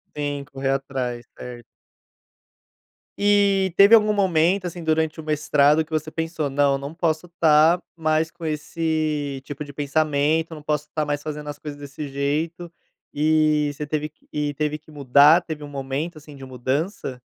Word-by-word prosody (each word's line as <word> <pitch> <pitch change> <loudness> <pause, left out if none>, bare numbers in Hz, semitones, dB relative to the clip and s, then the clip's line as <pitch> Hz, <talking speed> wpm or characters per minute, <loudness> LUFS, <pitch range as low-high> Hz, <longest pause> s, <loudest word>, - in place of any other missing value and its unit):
Sim, 145 -1 -3
correr 135 -1 -4
atrás, 135 -3 -2
certo. 120 -1 -9 1.6
E 200 -3 +3
teve 200 +3 +7
algum 215 -1 +4
momento, 185 -1 +2
assim, 175 0 -5
durante 160 0 0
o 160 - -6
mestrado 150 0 +3
que 155 - -22
você 155 0 -2
pensou: 160 -2 -3
"Não, 140 0 +2
eu - - -1
não 140 +2 -7
posso 165 0 -1
tá 165 0 +4
mais 160 -1 0
com 170 -1 -10
esse 155 -2 -2
tipo 145 +2 -7
de 145 - -11
pensamento, 150 +2 0
eu - - -6
não 150 - -11
posso 150 0 -1
tá 155 -1 0
mais 145 0 -2
fazendo 150 -1 -6
as 145 - -7
coisas 150 -1 -7
desse 145 +1 -7
jeito." 155 +5 -2 0.4
E 155 -1 +2
você 150 +1 -5
teve 150 0 -2
que 155 - -28
e 150 -1 -2
teve 150 +1 -2
que 155 - -23
mudar, 145 +3 +5
teve 155 -3 -7
um - - -9
momento, 140 +4 -4
assim, 150 0 -13
de 135 -1 -10
mudança? 130 - -3
150 Hz, 175 wpm, -23 LUFS, 145-160 Hz, 1.6 s, teve